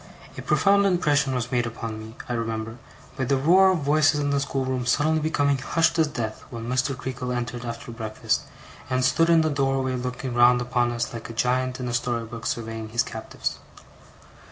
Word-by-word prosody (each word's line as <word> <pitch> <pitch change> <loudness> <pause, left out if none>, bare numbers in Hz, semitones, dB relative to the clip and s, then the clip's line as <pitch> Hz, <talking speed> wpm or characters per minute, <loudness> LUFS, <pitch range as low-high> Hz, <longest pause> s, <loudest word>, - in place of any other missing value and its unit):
A - - -6
profound 200 0 +3
impression 150 -7 +2
was 125 -1 -2
made 120 -2 +1
upon 115 -1 -6
me, 110 +1 -10
I 120 - -2
remember, 115 -1 -3 0.4
by 130 - 0
the 135 +2 +2
roar 180 +8 +5
of 180 -4 +1
voices 150 +1 +3
in 145 -1 0
the 140 - +2
schoolroom 130 -3 -2
suddenly 155 +5 +2
becoming 145 -3 +1
hushed 165 +5 +1
as 160 - +4
death 115 -7 -4
when 115 -1 -6
Mr. 130 +2 0
Creakle 125 -1 -4
entered 120 0 -3
after 115 0 -6
breakfast, 110 -2 -2 0.5
and 130 0 +1
stood 165 +6 +3
in 165 -1 +6
the 160 - +1
doorway 135 -2 0
looking 125 0 -4
round 120 +1 +5
upon 120 0 0
us 120 0 -3
like 115 -1 -7
a - - -6
giant 125 +2 0
in 125 - -3
a 120 - -3
story 120 -1 -1
book 115 -2 -7
surveying 115 -1 -4
his 120 +2 +1
captives. 110 -1 -5
125 Hz, 195 wpm, -25 LUFS, 120-140 Hz, 0.5 s, in